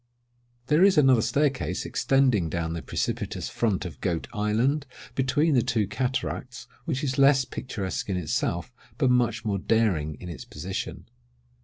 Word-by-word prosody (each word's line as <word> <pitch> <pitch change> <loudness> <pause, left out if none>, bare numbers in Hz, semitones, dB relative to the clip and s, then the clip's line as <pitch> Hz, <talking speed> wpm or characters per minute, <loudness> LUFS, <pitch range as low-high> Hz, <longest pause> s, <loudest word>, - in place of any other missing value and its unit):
There 150 +6 +4
is 195 -3 +5
another 135 -5 +6
staircase 140 +2 0
extending 130 -11 +2
down 80 0 -2
the 85 - -4
precipitous - - -3
front 105 -6 0
of 75 -7 -8
Goat 85 -3 -1
Island, 115 +7 +1 0.3
between 145 +4 +2
the 125 - +4
two 115 -3 +1
cataracts, 125 +3 -3 0.2
which 150 -3 -2
is 130 -1 -1
less 135 -1 +5
picturesque 105 -7 -4
in 95 - 0
itself, 85 +5 -2 0.2
but 130 +1 +3
much 120 -1 +1
more 100 -2 0
daring 90 -10 +1
in 90 - -10
its 75 -7 -7
position. 95 - -6
120 Hz, 150 wpm, -26 LUFS, 95-135 Hz, 0.3 s, another